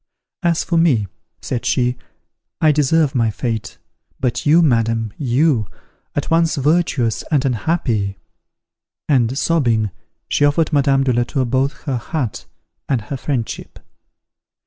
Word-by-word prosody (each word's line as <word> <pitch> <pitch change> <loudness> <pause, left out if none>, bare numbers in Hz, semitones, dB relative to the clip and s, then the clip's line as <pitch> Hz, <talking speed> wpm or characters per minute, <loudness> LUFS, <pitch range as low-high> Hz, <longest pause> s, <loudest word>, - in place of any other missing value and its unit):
"As 170 -2 +1
for 170 - 0
me," 135 -11 +3 0.4
said 120 -2 -3
she, 125 -1 +1 0.6
"I 155 - +5
deserve 150 0 +2
my 115 -3 +2
fate: 110 0 -4 0.4
but 125 +1 -1
you, 165 +3 +6
madam 115 -5 +1
you! 130 - +1 0.5
at 145 - -2
once 165 0 +3
virtuous 140 -6 +1
and 145 -3 +1
unhappy" 120 - -1 0.9
and, 130 -3 +2
sobbing, 120 - +1 0.4
she - - +1
offered 150 +3 +2
Madame 140 -1 +3
de 130 -2 +1
la 120 +1 +2
Tour 130 +2 -1
both 135 +4 -1
her 135 -5 -1
hut 125 -1 -4 0.4
and 135 -4 +2
her 120 +6 -6
friendship. 130 -3 -4
135 Hz, 130 wpm, -19 LUFS, 120-150 Hz, 0.9 s, you